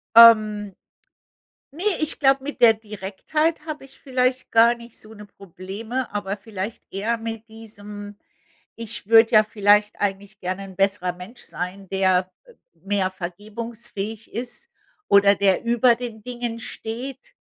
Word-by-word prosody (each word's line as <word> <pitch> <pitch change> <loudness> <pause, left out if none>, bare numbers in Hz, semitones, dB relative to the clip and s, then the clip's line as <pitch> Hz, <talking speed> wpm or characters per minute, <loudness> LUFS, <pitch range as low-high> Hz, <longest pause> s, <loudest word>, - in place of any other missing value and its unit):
Ähm, 215 -3 +7 1.0
ne, 330 +6 -7 0.2
ich 310 0 -1
glaube, 270 -1 +3
mit 285 -3 -7
der 225 -2 +8
Direktheit 220 - -2
habe 305 -3 -6
ich 270 - -19
vielleicht 255 -1 -1
gar 230 +1 +6
nicht 235 -1 -14
so 215 +1 -13
'ne 210 -1 -11
Probleme, 200 +6 -6
aber 205 0 -3
vielleicht 205 +1 -6
eher 220 +4 -1
mit 225 0 -6
diesem 205 -2 -10 0.6
ich 230 -3 -8
würde 225 +1 +6
ja 215 0 +8
vielleicht 210 0 +2
eigentlich 200 +1 -3
gerne 185 +1 -4
'n 190 -1 -11
besserer 195 -2 0
Mensch 180 +7 -12
sein, 185 +2 -6
der, 185 -1 +2
äh, 485 - -18 0.2
mehr 195 -1 -1
vergebungsfähig 215 +3 -7
ist 250 - -6 0.4
oder 200 0 +6
der 195 -2 +2
über 235 0 +4
den 230 -3 -7
Dingen 240 -2 -4
steht 265 - -6
215 Hz, 140 wpm, -23 LUFS, 200-235 Hz, 1.0 s, der